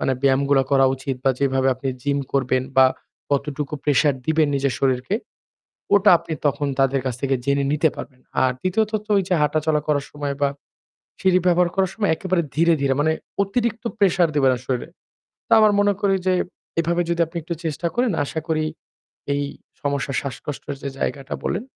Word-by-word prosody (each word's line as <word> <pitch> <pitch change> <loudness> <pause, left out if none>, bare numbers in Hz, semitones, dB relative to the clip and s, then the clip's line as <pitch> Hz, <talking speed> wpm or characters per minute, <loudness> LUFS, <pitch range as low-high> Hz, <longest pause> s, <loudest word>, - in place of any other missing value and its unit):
মানে 135 - +1
ব্যায়ামগুলো 140 0 +3
করা 135 -1 +5
উচিত 135 0 -4
বা 135 - +5
যেভাবে 135 -1 +2
আপনি 130 +2 -5
জিম 140 +1 0
করবেন 130 -1 +1 0.2
বা 130 - +8 0.4
কতটুকু 145 +1 -1
pressure 145 -1 +3
দিবেন 160 -1 +3
নিজের 140 -1 0
শরীরকে, 130 +6 +1 0.8
ওটা 205 +1 +6
আপনি 165 - -8
তখন 145 0 0
তাদের 135 0 +2
কাছ 130 -2 -1
থেকে 135 -1 +1
জেনে 140 +1 +1
নিতে 155 +2 +3
পারবেন। 130 -2 -9 0.2
আর 130 - +4
দ্বিতীয়ত 210 +4 0
তো 215 - -18
ওই 195 - +3
যে 185 - +2
হাঁটাচলা 150 +1 +1
করার 145 -2 +1
সময় 145 -1 -4
বা 140 - +4 0.7
সিঁড়ি 185 -1 +4
ব্যবহার 175 0 +4
করার 190 -1 +1
সময় 210 -3 0
একেবারে 185 -1 0
ধীরে, 165 +3 +4
ধীরে 135 -1 +2
মানে 160 +2 +3 0.3
অতিরিক্ত 225 +3 -1 0.2
pressure 180 -4 +3
দিবেন 135 -3 +4
না - - -5
শরীরে। 125 -2 -2 0.6
তা - - -3
আমার 215 -1 +5
মনে 205 0 +3
করি 195 -2 +2
যে 185 - +3 0.5
এভাবে 170 +1 +1
যদি 170 0 0
আপনি 165 - -12
একটু 170 +2 -4
চেষ্টা 160 +1 -2
করেন 245 0 +2
আশা 160 +3 -4
করি 155 -1 +1 0.7
এই 145 0 0 0.4
সমস্যা 140 -1 -1
শ্বাসকষ্টের 140 +2 -6
যে 140 - -3
জায়গাটা 135 -1 -3
বলেন 190 - -1
145 Hz, 180 wpm, -22 LUFS, 135-175 Hz, 0.8 s, বা